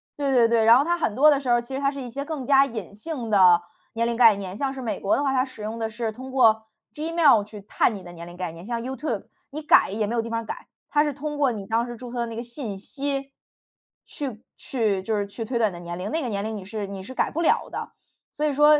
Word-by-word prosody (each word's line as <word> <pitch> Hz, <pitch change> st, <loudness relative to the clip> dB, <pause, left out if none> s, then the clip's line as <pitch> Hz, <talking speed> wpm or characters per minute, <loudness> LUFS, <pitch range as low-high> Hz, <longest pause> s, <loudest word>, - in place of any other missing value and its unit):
对 280 Hz, -2 st, 0 dB
对 235 Hz, -2 st, +6 dB
对， 230 Hz, -1 st, +3 dB
然 230 Hz, +2 st, +8 dB
后 280 Hz, -, +2 dB
它 345 Hz, 0 st, +1 dB
很 270 Hz, -, 0 dB
多 295 Hz, +5 st, +7 dB
的 285 Hz, -2 st, +4 dB
时 265 Hz, -3 st, -4 dB
候 240 Hz, -, +5 dB
儿， 240 Hz, -, +2 dB
其 250 Hz, +3 st, -7 dB
实 270 Hz, -, -3 dB
它 275 Hz, 0 st, +2 dB
是 280 Hz, -1 st, -6 dB
一 245 Hz, -, -6 dB
些 280 Hz, +4 st, -4 dB
更 290 Hz, -4 st, -5 dB
加 275 Hz, -1 st, +6 dB
隐 220 Hz, -6 st, -7 dB
性 245 Hz, 0 st, -5 dB
的 180 Hz, -4 st, +6 dB, 0.3 s
年 230 Hz, +1 st, 0 dB
龄 235 Hz, -, -1 dB
概 230 Hz, -3 st, +7 dB
念， 190 Hz, -2 st, -6 dB
像 270 Hz, +4 st, -2 dB
是 265 Hz, -, -7 dB
美 230 Hz, -3 st, -3 dB
国 200 Hz, -, +2 dB
的 285 Hz, -, 0 dB
话， 270 Hz, -1 st, +1 dB
它 255 Hz, -, +3 dB
使 260 Hz, -5 st, -10 dB
用 220 Hz, +2 st, -4 dB
的 225 Hz, -1 st, -2 dB
是 220 Hz, 0 st, -3 dB
通 260 Hz, +3 st, -9 dB
过 220 Hz, -4 st, +4 dB, 0.3 s
Gmail 310 Hz, -7 st, +4 dB
去 210 Hz, 0 st, -11 dB
探 210 Hz, +2 st, +1 dB
你 190 Hz, -, -9 dB
的 175 Hz, 0 st, -10 dB
年 170 Hz, 0 st, -9 dB
龄 175 Hz, 0 st, -11 dB
概 180 Hz, -3 st, -4 dB
念。 165 Hz, +1 st, -11 dB
像 235 Hz, +1 st, -3 dB
YouTube， 265 Hz, +5 st, -3 dB, 0.2 s
你 305 Hz, +3 st, -6 dB
改 300 Hz, -, +5 dB
也 210 Hz, +2 st, -1 dB
没 230 Hz, -, -2 dB
有 230 Hz, -, +2 dB
地 230 Hz, -, -6 dB
方 230 Hz, 0 st, -1 dB
儿 225 Hz, -, -10 dB
改， -, -, -7 dB, 0.2 s
它 295 Hz, 0 st, +3 dB
是 295 Hz, -, 0 dB
通 295 Hz, +2 st, -5 dB
过 280 Hz, -3 st, +3 dB
你 205 Hz, -4 st, -6 dB
当 230 Hz, +3 st, +1 dB
时 240 Hz, -1 st, -7 dB
注 245 Hz, 0 st, -9 dB
册 245 Hz, -, -4 dB
的 235 Hz, -, 0 dB
那 230 Hz, -, -7 dB
个 235 Hz, -, -4 dB
信 235 Hz, -4 st, -6 dB
息， 275 Hz, +5 st, -4 dB, 0.7 s
去 255 Hz, -6 st, -6 dB
去 215 Hz, -7 st, -1 dB
就 215 Hz, +3 st, -1 dB
是 205 Hz, -, 0 dB
去 200 Hz, +3 st, -6 dB
推 235 Hz, +2 st, -2 dB
断 220 Hz, -4 st, +2 dB
你 -, -, -11 dB
的 175 Hz, -, -8 dB
年 175 Hz, 0 st, -6 dB
龄， 190 Hz, +7 st, -4 dB
那 325 Hz, +1 st, 0 dB
个 255 Hz, -, -3 dB
年 200 Hz, -3 st, -2 dB
龄 220 Hz, +1 st, -3 dB
你 200 Hz, -3 st, -7 dB
是 210 Hz, 0 st, -4 dB
你 195 Hz, -1 st, -7 dB
是 260 Hz, +8 st, -9 dB
改 -, -, +1 dB
不 330 Hz, -, -2 dB
了 335 Hz, -, +2 dB
的。 -, -, -5 dB, 0.4 s
所 300 Hz, -, -2 dB
以 295 Hz, -, +1 dB
说， 295 Hz, +2 st, +6 dB
235 Hz, 350 characters per minute, -25 LUFS, 210-275 Hz, 0.7 s, 然